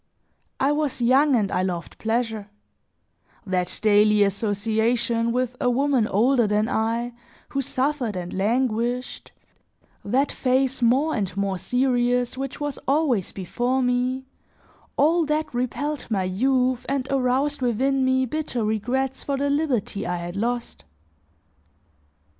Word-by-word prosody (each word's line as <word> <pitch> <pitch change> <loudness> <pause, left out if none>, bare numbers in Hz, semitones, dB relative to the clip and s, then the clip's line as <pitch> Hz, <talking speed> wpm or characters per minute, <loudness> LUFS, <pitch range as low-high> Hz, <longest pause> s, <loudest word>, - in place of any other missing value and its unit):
I 275 +2 +3
was 295 -3 -1
young 265 +4 +4
and 205 -5 +1
I - - +1
loved 180 -2 -4
pleasure; 225 -2 -2 1.0
that 180 -2 -1
daily 210 0 +5
association 225 +3 0
with 250 0 -1
a 250 - +3
woman 260 -2 +2
older 240 +3 +3
than 210 +1 +1
I 230 +2 -1 0.4
who 275 - -1
suffered 260 -4 -1
and 180 -1 -5
languished, 240 +4 -1 0.7
that 265 +7 +1
face 260 0 0
more 265 +7 +3
and 200 -4 -2
more 195 -2 -1
serious, 245 +1 +1
which 270 0 -5
was 290 -2 -3
always 270 - +1
before 245 +7 -1
me, 250 +1 0 0.7
all 325 +4 +4
that 305 -1 -1
repelled 280 +4 -2
my 200 -4 0
youth 255 +6 +1
and 270 -1 -1
aroused 270 +2 +1
within 265 +3 +1
me 260 0 +2
bitter 255 -4 -2
regrets 255 +5 -1
for 280 -1 -2
the 280 +1 0
liberty 260 - -1
I 180 - -1
had 175 +1 -6
lost. 235 - -3
245 Hz, 130 wpm, -24 LUFS, 215-270 Hz, 1.0 s, daily